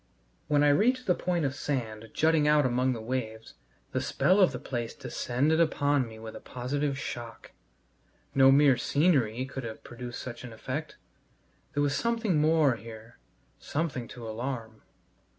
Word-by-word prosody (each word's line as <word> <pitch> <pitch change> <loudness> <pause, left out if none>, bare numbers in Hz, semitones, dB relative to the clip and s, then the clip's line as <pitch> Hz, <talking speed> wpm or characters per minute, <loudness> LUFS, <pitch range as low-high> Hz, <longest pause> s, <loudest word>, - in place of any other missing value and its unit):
When 145 -1 +3
I 145 - +5
reached 250 - +3
the 180 - +4
point 175 -3 -1
of 135 - -1
sand 115 -6 -4
jutting 160 -1 +3
out 150 -1 +4
among 125 +1 +1
the 115 - -6
waves, 110 - -4 0.4
the - - -1
spell 185 +3 +2
of 185 - +5
the - - -4
place 120 -3 -4
descended 145 +6 0
upon 145 -5 +2
me 110 -1 -11
with 110 0 -9
a - - -7
positive 140 +3 -3
shock. 120 -4 -7 0.8
No 135 0 +7
mere 140 -2 +5
"scenery" 130 -4 +2
could 135 0 -6
have 110 -1 -7
produced 120 0 -7
such 120 -1 -7
an 120 -2 -8
effect. 130 +7 -5 0.8
There 145 - +2
was 140 -1 +1
something 220 -3 +1
more 155 -5 +3
here, 110 - -12 0.4
something 140 -6 -3
to 120 -2 -9
alarm. 115 -1 -5
135 Hz, 160 wpm, -29 LUFS, 120-150 Hz, 0.8 s, No